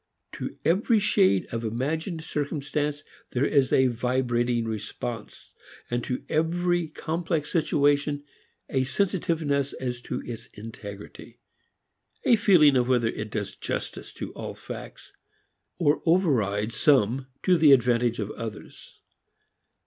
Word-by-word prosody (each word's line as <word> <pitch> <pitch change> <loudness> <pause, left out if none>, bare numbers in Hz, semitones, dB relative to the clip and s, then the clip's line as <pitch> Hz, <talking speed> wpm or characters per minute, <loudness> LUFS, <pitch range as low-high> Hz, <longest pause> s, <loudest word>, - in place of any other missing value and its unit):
To - - -6
every 205 +7 +3
shade 195 - +3
of 115 0 -3
imagined 155 - -2
circumstance 145 -1 -2 0.3
there 130 +3 +2
is 140 -3 +2
a 130 - +5
vibrating 120 -1 0
response; 110 +1 -6 0.4
and 120 0 0
to 125 - -3
every 175 +2 +1
complex 160 0 -3
situation 145 -3 +2 0.4
a 130 -1 +1
sensitiveness 155 -4 0
as 125 -1 -4
to - - -4
its 115 0 -6
integrity, 105 -2 -10 0.9
a 240 - +5
feeling 180 - +5
of 125 -1 +2
whether 120 -3 +2
it 105 -1 -5
does 105 -2 -4
justice - - -5
to - - -6
all - - -7
facts, - - -9 0.6
or 150 -4 +2
overrides 115 - +2
some 130 0 +3 0.2
to 185 - +4
the 155 -4 +6
advantage 120 -2 +4
of 105 -1 -3
others. 110 -2 -9
135 Hz, 120 wpm, -26 LUFS, 120-160 Hz, 0.9 s, the